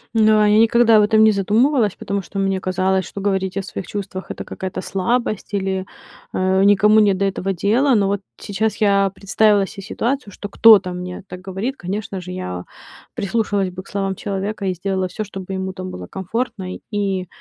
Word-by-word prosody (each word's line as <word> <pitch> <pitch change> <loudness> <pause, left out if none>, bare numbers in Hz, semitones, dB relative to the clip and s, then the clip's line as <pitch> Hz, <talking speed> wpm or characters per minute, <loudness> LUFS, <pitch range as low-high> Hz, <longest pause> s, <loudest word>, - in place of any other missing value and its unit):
Да, 215 -1 +5
я 210 +1 +5
никогда 230 0 +5
об 210 - +5
этом 220 +1 +4
не 220 - +6
задумывалась, 215 +3 +2
потому 200 0 -3
что 195 - -9
мне 195 -1 0
казалось, 185 0 0
что 200 - -7
говорить 190 -1 -1
о 195 - -2
своих 190 - -7
чувствах- 195 -2 -5
это - - -6
какая-то 185 0 -5
слабость 215 +2 -2
или, 190 -1 -1 0.5
а, 190 +1 +2
никому 210 +2 +5
не 205 -2 +4
до 190 +1 -2
этого 195 0 -1
дела. 235 +9 +2
Но 200 -2 +2
вот 200 0 -1 0.2
сейчас 210 +1 -2
я 200 -1 +3
представила 205 +1 +3
се 195 - -9
ситуацию, 230 +1 -3
что 205 - -7
кто-то 210 -4 +6
мне 180 +1 -6
так 180 - -7
говорит. 195 +8 -4
Конечно 195 +1 -4
же, 180 0 -8
я 90 - -5 0.5
прислушалась 200 -2 0
бы 185 +1 -8
к - - -19
словам 195 -1 -2
человека 200 +1 -4
и 185 - 0
сделала 190 +1 -2
всё, 215 +4 -5
чтобы 195 -1 -7
ему 190 0 -3
там 185 0 -7
было 90 0 -8
комфортно 190 -1 -4
и, 195 -3 -3
195 Hz, 190 wpm, -20 LUFS, 190-210 Hz, 0.5 s, не